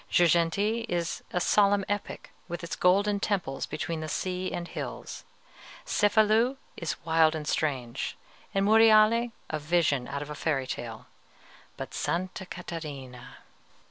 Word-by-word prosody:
Girgenti 175 +7 +3
is 170 -1 -2
a 180 - 0
solemn 200 +1 +3
epic, 205 0 -4 0.2
with 175 -1 -5
its 170 - -4
golden 200 +3 +3
temples 190 -10 -1
between 160 +2 -3
the 155 - -4
sea 185 +3 -2
and 175 0 -4
hills. - - -6 0.6
Cefalù 220 +5 +3 0.2
is 170 - -3
wild 160 -1 +4
and 150 -1 -5
strange, 130 -7 -2 0.3
and 195 0 +1
Monreale 225 +2 +6 0.2
a 155 - -1
vision 150 -4 +1
out 140 +1 -4
of 150 - -9
a - - -3
fairy 145 -3 -1
tale; 115 -3 -6 0.7
but - - -6
Sta. 185 +2 -1 0.2
Catarina! 145 -8 -8
175 Hz, 135 wpm, -28 LUFS, 155-205 Hz, 0.7 s, Monreale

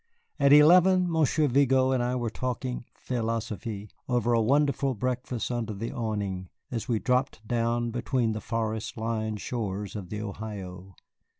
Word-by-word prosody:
At 140 -1 +5
eleven, 180 +5 +7
Monsieur 155 -1 +2
Vigo 130 0 +3
and 130 -2 +2
I 125 +1 0
were 120 -3 -2
talking 125 +1 -3
"philosophe" 110 -3 -3 0.2
over 120 -1 +2
a 115 - +4
wonderful 140 +2 +2
breakfast 125 +1 -2
under 115 -3 -2
the 115 +4 -4
awning, 100 -5 -3 0.2
as 115 0 -3
we 120 -3 +1
dropped 125 -2 0
down 120 0 0
between 120 0 0
the 110 0 -4
forest 110 -1 -3
lined 110 -1 -2
shores 105 -4 -3
of 95 -4 -6
the 105 - -4
Ohio. 95 -3 -7
115 Hz, 145 wpm, -28 LUFS, 110-130 Hz, 0.2 s, eleven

